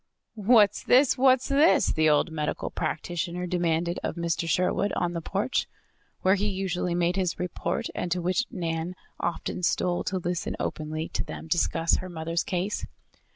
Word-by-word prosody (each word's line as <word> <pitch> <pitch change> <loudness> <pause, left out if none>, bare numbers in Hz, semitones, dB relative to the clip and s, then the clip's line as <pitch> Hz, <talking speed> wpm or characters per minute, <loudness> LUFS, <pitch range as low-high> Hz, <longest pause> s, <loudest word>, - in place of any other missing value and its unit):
"What's 215 -1 +4
this? 260 +1 +4
What's 260 -1 +4
this?" 290 +4 +4
the 155 0 +3
old 150 +3 +3
medical 150 -1 -3
practitioner 175 +2 -3
demanded 175 -1 0
of - - -3
Mr. 170 -1 -1
Sherwood, 185 +4 +1
on 175 0 -1
the 170 - -3
porch, 200 +10 -1 0.6
where 190 - +5
he 205 +1 +1
usually 185 -3 -1
made 175 +2 +1
his 185 -3 0
report, 180 +4 -2
and 175 - -3
to 180 - +1
which 185 +7 0
Nan 165 +1 -3 0.2
often 175 +1 -3
stole 175 0 +1
to 185 +2 -1
listen 175 -1 -2
openly 155 +1 -3
to - - -2
them - - -8
discuss 165 0 +1
her 185 - -6
mother's 165 0 -2
case. 185 +3 -2
175 Hz, 160 wpm, -27 LUFS, 165-195 Hz, 0.6 s, where